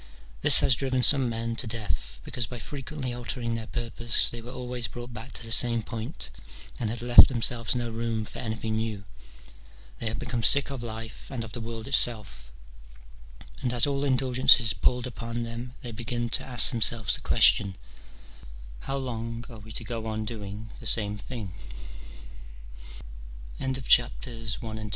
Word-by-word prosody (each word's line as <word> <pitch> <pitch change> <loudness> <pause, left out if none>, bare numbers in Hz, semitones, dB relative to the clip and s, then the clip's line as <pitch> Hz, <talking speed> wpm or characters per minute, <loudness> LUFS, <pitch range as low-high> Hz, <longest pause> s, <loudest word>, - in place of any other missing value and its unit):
This - - +9
has 125 - +4
driven 130 0 -1
some 135 -3 +5
men 115 0 -3
to 120 - -1
death, 65 - -4
because 120 -3 -4
by 125 - -8
frequently 135 0 -6
altering 120 0 -4
their 115 -1 -5
purpose 120 -1 +1
they 120 - -7
were 120 - -10
always 125 -2 -4
brought 120 +3 -9
back 115 +4 -8
to - - -4
the 115 - -6
same 115 0 +3
point, 115 +5 -7 0.5
and 115 - -1
had 115 +1 -4
left 120 0 +9
themselves 120 -1 +1
no 120 -1 -2
room 115 -1 -2
for - - -9
anything 110 -1 -3
new. 110 -3 -3 1.0
They 115 - -3
had 110 - -3
become 120 -1 -3
sick 140 +5 +5
of 135 -3 -5
life 115 -1 -7
and 125 -4 -4
of 110 - -9
the 120 - -7
world 115 +1 -6
itself, 105 - 0 1.1
and 125 - 0
as 120 -2 +3
all 140 -1 -1
indulgences 130 -4 +4
palled 125 +6 +1
upon 120 -1 -5
them 120 +2 -7
they 120 - -6
began 120 +1 -3
to - - -2
ask 125 0 +3
themselves 115 -2 +3
the - - -3
question, 100 -2 +4 0.5
" - - -16
How 135 - -1
long 115 -2 -5
are 110 - -10
we 110 +1 -12
to 115 - -4
go 115 0 -5
115 Hz, 150 wpm, -27 LUFS, 110-125 Hz, 1.1 s, This